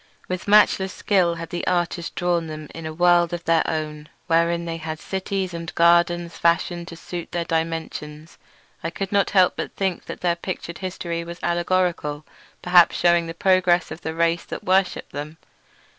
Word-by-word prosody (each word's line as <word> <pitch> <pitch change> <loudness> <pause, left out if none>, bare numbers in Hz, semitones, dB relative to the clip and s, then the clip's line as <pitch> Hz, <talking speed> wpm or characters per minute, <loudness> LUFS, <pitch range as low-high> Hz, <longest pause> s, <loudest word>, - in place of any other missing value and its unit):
With 185 +1 -4
matchless 200 -2 +5
skill 180 -6 +1
had 165 0 -7
the 175 - -4
artist 175 -1 -1
drawn 175 -2 0
them 155 -1 -7
in 165 -1 -6
a - - -4
world 175 +1 +3
of 170 -1 -4
their 165 0 +3
own, 150 -1 -4 0.2
wherein 170 0 +2
they 165 -1 -4
had 160 -1 -5
cities 190 0 -3
and 170 -1 -5
gardens 170 0 +3
fashioned 170 +1 +1
to 165 - -8
suit 170 0 -7
their 170 -1 -2
dimensions; 160 -1 -4 0.4
and - - -2
I - - -2
could 195 +2 -5
not 200 -1 +2 0.2
but - - -5
think 190 -2 -2
that - - -8
their 175 -1 +2
pictured 170 -1 -6
history 175 -3 -4
was 170 +1 -8
allegorical, 175 -4 0 0.4
perhaps 180 -1 +6
shewing 170 -1 +3
the 165 - -6
progress 180 -1 +3
of 165 - -7
the 160 -1 -4
race 170 0 +1
that - - -7
worshipped 190 0 +1
them. 150 +3 -6
170 Hz, 175 wpm, -23 LUFS, 165-180 Hz, 0.4 s, perhaps